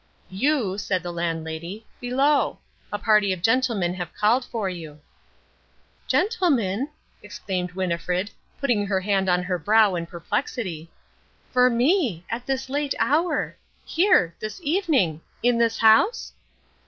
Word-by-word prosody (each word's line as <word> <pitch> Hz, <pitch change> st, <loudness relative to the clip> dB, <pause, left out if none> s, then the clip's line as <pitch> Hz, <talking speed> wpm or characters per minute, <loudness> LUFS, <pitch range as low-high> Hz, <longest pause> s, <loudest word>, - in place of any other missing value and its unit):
"You," 210 Hz, -2 st, 0 dB
said 185 Hz, -3 st, -1 dB
the 175 Hz, -, -4 dB
Landlady, 170 Hz, +4 st, -4 dB
"below. 270 Hz, +4 st, +1 dB, 0.3 s
A 205 Hz, -, -1 dB
party 210 Hz, -2 st, +3 dB
of 180 Hz, -2 st, -4 dB
gentlemen 225 Hz, -7 st, +2 dB
have 175 Hz, -2 st, -6 dB
called 230 Hz, +5 st, +2 dB
for 225 Hz, -5 st, -3 dB
you." 160 Hz, -5 st, -7 dB, 1.1 s
"Gentlemen," 280 Hz, -, +1 dB, 0.3 s
exclaimed 180 Hz, -2 st, -4 dB
Winnifred, 180 Hz, +1 st, -2 dB, 0.3 s
putting 235 Hz, -7 st, +1 dB
her 195 Hz, -1 st, +1 dB
hand 195 Hz, -1 st, +1 dB
to 180 Hz, 0 st, +2 dB
her 180 Hz, -1 st, -2 dB
brow 210 Hz, +4 st, +4 dB
in 170 Hz, -1 st, -3 dB
perplexity, 170 Hz, -, -4 dB, 0.6 s
"for 250 Hz, 0 st, +5 dB
me! 240 Hz, -, +1 dB
at 240 Hz, +2 st, -4 dB
this 265 Hz, -1 st, -2 dB
late 285 Hz, +1 st, -1 dB
hour! 330 Hz, +5 st, +1 dB, 0.3 s
Here! 330 Hz, -, +3 dB
This 215 Hz, -, -6 dB
evening! 285 Hz, -, +1 dB, 0.2 s
In 240 Hz, -1 st, +3 dB
this 230 Hz, -1 st, +2 dB
house?" 225 Hz, -, +4 dB
210 Hz, 130 wpm, -24 LUFS, 180-260 Hz, 1.1 s, for